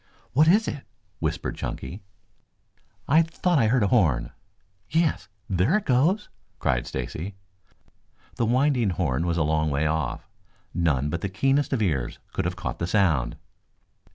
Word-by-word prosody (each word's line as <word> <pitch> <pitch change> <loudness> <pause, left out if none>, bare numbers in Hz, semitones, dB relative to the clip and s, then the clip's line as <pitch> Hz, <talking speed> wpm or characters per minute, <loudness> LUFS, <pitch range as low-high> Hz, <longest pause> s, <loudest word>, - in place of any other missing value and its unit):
"What 150 +5 +5
is 210 +6 +5
it?" 140 - -4 0.4
whispered - - -2
Chunky. 90 +11 -5 1.1
"I 155 +4 +6
thought 165 0 +1
I 115 - +4
heard 120 0 +3
a 100 - +2
horn." 65 - +2 0.6
"Yes, 155 - +1 0.2
there 100 - +2
it 215 - -4
goes," 160 - +2 0.3
cried - - 0
Stacy. 95 +5 -5 1.0
The 115 - +1
winding 125 -2 +2
horn 85 -3 0
was 85 0 0
a 80 - +2
long 80 0 +1
way 70 +2 0
off. 80 +1 -2 0.5
None 75 -4 +1
but 85 - -3
the 100 - -2
keenest 135 +9 +1
of 125 -5 +1
ears 70 -11 -1 0.2
could - - -1
have - - -1
caught - - -5
the 85 - -1
sound. 90 - +2
100 Hz, 155 wpm, -25 LUFS, -, 1.1 s, I